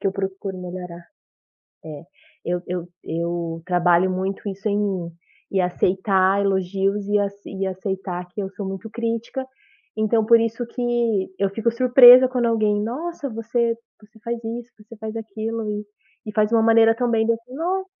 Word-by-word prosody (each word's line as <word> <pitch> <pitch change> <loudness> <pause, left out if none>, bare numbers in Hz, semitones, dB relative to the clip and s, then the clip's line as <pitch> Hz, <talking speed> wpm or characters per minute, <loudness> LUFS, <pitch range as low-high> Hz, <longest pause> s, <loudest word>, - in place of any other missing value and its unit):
que - - -2
eu 195 - +1
procuro 195 -1 -4
melhorar 180 -1 -8 0.8
é, 150 -2 -8 0.4
eu 175 0 -1
eu 175 -1 -4 0.2
eu 170 0 -3
trabalho 180 0 +3
muito 190 +2 -3
isso 195 +2 -4
em 200 - +1
mim, 190 -5 -2 0.4
em 190 - +2
aceitar 190 +2 +2
elogios 195 +1 0
e 205 0 +2
ace 200 0 -4
e 195 0 -3
aceitar 190 -1 -4
que 205 +3 -5
eu 190 - -4
sou 200 0 -6
muito 195 +3 -6
crítica, 230 +3 -3 0.5
então 220 +1 +2
por 230 +1 +6
isso 230 +1 -1
que 235 -6 0
eu 195 0 +2
fico 225 +4 0
surpresa 250 +1 +8
quando 250 -2 0
alguém: 215 -2 +1
"Nossa 285 +7 -4
você 230 +1 -1 0.2
você 215 +1 -20
faz 235 0 -2
isso, 235 +2 -6
você 215 +2 -13
faz 220 +1 -6
aquilo 220 0 -4
e 210 0 -4 0.4
e 215 - -6
faz 215 0 +2
uma 225 - +5
maneira 225 0 +5
tão 245 +1 0
bem" 225 -1 +2
dai 230 - +3
eu - - -13
falei: 255 +4 -10 0.2
"Ó". - - -13
210 Hz, 175 wpm, -22 LUFS, 190-230 Hz, 0.8 s, surpresa